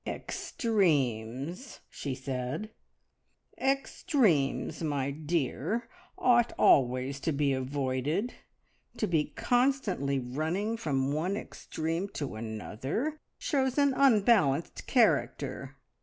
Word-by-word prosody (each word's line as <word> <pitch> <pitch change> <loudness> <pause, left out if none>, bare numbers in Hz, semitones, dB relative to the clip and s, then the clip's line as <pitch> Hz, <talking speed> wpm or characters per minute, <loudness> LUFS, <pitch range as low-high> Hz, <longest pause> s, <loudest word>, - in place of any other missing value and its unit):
"Extremes," 150 - -1
she 140 -3 -5
said, 130 - -4 0.9
"extremes, 255 - +1
my 140 -3 -1
dear, 160 - -2 0.3
ought 240 -1 +4
always 130 +1 +3
to 160 - -1
be 140 -1 +1
avoided. 135 - -1 0.6
To - - +1
be 160 -6 +1
constantly 230 - +1
running 160 - -2
from 140 -10 -1
one 175 +7 -1
extreme 165 0 -4
to 140 -6 -4
another 115 - -4 0.2
shows 265 -3 0
an 280 -1 +4
unbalanced 210 - +3
character. - - +1
155 Hz, 90 wpm, -30 LUFS, -, 0.9 s, ought